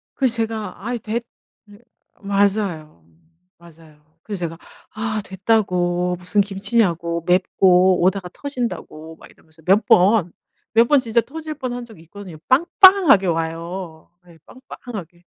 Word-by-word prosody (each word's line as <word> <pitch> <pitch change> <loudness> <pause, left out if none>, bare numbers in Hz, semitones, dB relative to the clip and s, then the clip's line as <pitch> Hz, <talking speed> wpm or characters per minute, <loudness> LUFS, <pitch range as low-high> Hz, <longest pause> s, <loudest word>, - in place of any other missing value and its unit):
그래서 255 -4 +4
제가 220 -4 -4
"아이 240 0 -3
됐" 225 +2 -4 0.5
예 205 +1 -16 0.4
맞아요. 195 - -1 0.5
맞아요. 160 -2 -20
그래서 205 -3 -6
제가 165 0 -7 0.4
"아 215 0 -3
됐다."고 180 -3 0
"무슨 180 +3 +1
김치냐."고 195 -5 -1
"맵고 185 0 +3
오다가 185 -1 0
터진다."고 235 - -6
막 - - -16
이러면서 160 0 -20
몇 195 +4 +3
번, 185 -1 +3 0.4
몇 230 +1 +4
번 290 -2 +4
진짜 235 -1 +1
터질 310 +4 -8
뻔한 245 -4 -6
적이 220 -8 -16
있거든요. 180 -1 -12
빵빵하게 335 - +5
와요. 165 0 -5 0.2
예 170 -2 -18
빵빵하게. 200 - -11
195 Hz, 275 characters per minute, -20 LUFS, 170-225 Hz, 0.5 s, 빵빵하게